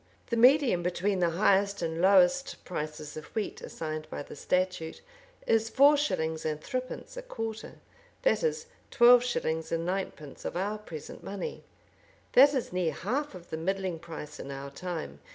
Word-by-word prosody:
The - - +2
medium 250 -5 +5
between 180 +3 0
the 175 -1 +3
highest 200 -1 +3
and 165 0 -2
lowest 190 +7 +4
prices 150 -3 -5
of 155 - -7
wheat, 215 -2 -3
assigned 155 -1 -5
by - - -5
the - - -11
statute, 180 0 -1 0.5
is 225 0 +2
four 285 +4 +6
shillings 160 - -1
and 155 -1 -2
threepence 255 - -5
a - - -3
quarter; 225 - -6 0.5
that - - +3
is, 470 -1 -1 0.2
twelve 240 0 +7
shillings 160 -10 -2
and 165 0 -1
ninepence 180 -6 -4
of - - -3
our 205 +3 -2
present 160 -8 -9
money. 195 -2 -5 0.7
This 280 +3 +7
is 250 -8 -2
near 180 -3 0
half 255 +6 -2
of 175 -1 -12
the 160 - -2
middling 185 0 -2
price 160 -3 -8
in - - -7
our 140 0 -6
time. 165 - -5
185 Hz, 165 wpm, -29 LUFS, 160-235 Hz, 0.7 s, twelve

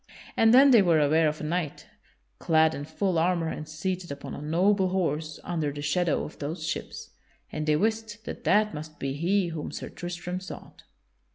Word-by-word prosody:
And 225 0 +5
then 270 +3 +8
they 235 -4 +8
were 170 -4 +4
aware 155 +2 +4
of 150 0 -2
a - - -5
knight, 160 -1 -3 0.5
clad 160 -2 +3
in 145 - -5
full 170 +3 0
armor 170 -1 +1
and 155 -1 -6
seated 175 +1 -3
upon 140 0 -7
a - - -7
noble 185 +5 +2
horse 160 -4 -1
under 160 -4 -2
the 145 0 -7
shadow 165 +3 +1
of - - -9
those 155 +3 -4
ships, 160 - -5 0.4
and 155 0 -4
they 150 - +4
wist 220 +3 -1
that - - -7
that 210 +2 +3
must 155 0 -8
be 135 0 -3
he 175 +5 +1
whom 160 -2 -5
Sir - - -6
Tristram 175 +1 -5
sought. 185 - -10
165 Hz, 190 wpm, -27 LUFS, 155-185 Hz, 0.5 s, then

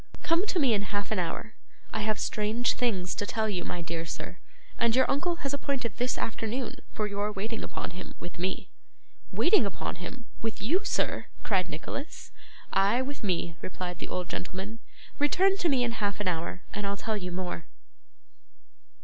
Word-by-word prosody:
Come 340 +5 +3
to 380 - +1
me 270 -8 +5
in 205 - +3
half 205 +1 -2
an 215 - +2
hour; 180 +5 -2 0.4
I 220 - 0
have 215 0 +2
strange 215 +5 +2
things 195 -8 +1
to 205 - -1
tell 220 -1 +1
you, 185 -4 0
my 175 - -2
dear 165 0 -2
sir, 165 - -5 0.4
and 230 0 +5
your 260 - +6
uncle 345 +5 +2
has 275 - +1
appointed 270 -6 -1
this 245 +1 +1
afternoon 225 +3 -1
for 215 - 0
your 205 0 0
waiting 215 +3 -2
upon - - -3
him 185 +1 -8
with 175 0 -7
me.' 185 +2 -1 0.6
'Waiting 425 - +6
upon 200 -4 -2
him! 235 +7 -6 0.2
With 225 -1 -1
you, 325 - +2
sir!' 415 - +1 0.2
cried 190 -4 +2
Nicholas. 280 - -5 0.4
'Ay, 205 +6 +5
with 285 -1 -5
me,' 175 -4 +1
replied 180 -1 -4
the - - -3
old 180 -1 -2
gentleman. 190 +5 -4 0.4
'Return 375 +7 +5
to 350 - +3
me 265 -4 +4
in 240 - +2
half 205 -3 0
an 205 - 0
hour, 175 +1 -1
and 205 0 -1
I'll 200 0 0
tell 220 +1 -1
you 180 -3 -3
more. 175 -3 -3
210 Hz, 185 wpm, -30 LUFS, 185-245 Hz, 0.6 s, your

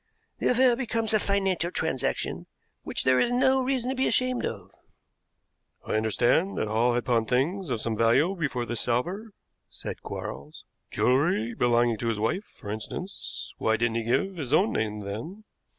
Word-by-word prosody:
The - - +1
affair 250 0 +4
becomes 230 -3 0
a 215 - +4
financial 195 -4 +1
transaction - - -2 0.3
which - - -3
there 130 0 +4
is 240 - +2
no 260 +1 +3
reason 255 -1 0
to - - -2
be 260 - +1
ashamed 255 -1 +1
of." - - -7 1.1
"I - - -5
understood 120 - +2
that - - -1
Hall 115 +3 +2
had 120 - -1
pawned 115 -3 +1
things 160 - 0
of 115 -4 -1
some 115 -1 -1
value 120 - +3
before 130 -8 -2
this 120 -1 -3
salver," 175 - -1 0.4
said - - -7
Quarles; 75 +2 -7 0.2
"jewelry 125 - +2
belonging 120 -1 +2
to 115 - -2
his 115 -2 -1
wife, 150 - -1
for 105 - -9
instance. 145 - -6
Why 110 0 +2
didn't 115 0 0
he 115 - -1
give 155 +11 0
his 140 -4 -3
own 195 +8 +4
name 105 -1 -2
then?" 115 - -6
130 Hz, 170 wpm, -27 LUFS, -, 1.1 s, affair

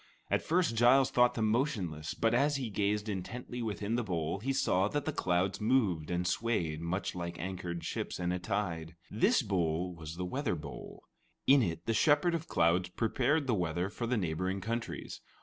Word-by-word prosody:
At - - +2
first, 165 -7 +1
Giles 130 +3 +5
thought 125 -1 +4
them 110 - +1
motionless, 100 - -1
but 115 0 +1
as 145 +4 +3
he 130 -5 -3
gazed 105 +1 0
intently 115 +5 -5
within 105 -1 -2
the 120 - 0
bowl, 85 -3 -2
he 130 +6 -1
saw 95 -8 +2
that 145 +5 -2
the 155 - 0
clouds 90 +1 0
moved 105 -10 +2
and 90 0 -1
swayed 90 -7 0
much 90 +4 -2
like 85 -1 -5
anchored 90 -2 -4
ships - - -4
in 90 0 0
a 90 - -1
tide. 85 -5 -3 0.2
This 165 - +3
bowl 90 -3 0
was 80 -1 -8
the 90 +1 -3
weather 90 - -1
bowl. - - -9 0.4
In 140 0 +6
it 85 -5 -2
the 115 - +1
Shepherd 150 +9 +3
of 165 -1 -3
Clouds 85 +2 +2
prepared 130 - +1
the 125 - +1
weather 90 0 -1
for 120 +2 -4
the 125 0 +1
neighboring 90 +1 -1
countries. 115 +4 -4
100 Hz, 185 wpm, -32 LUFS, 90-120 Hz, 0.4 s, In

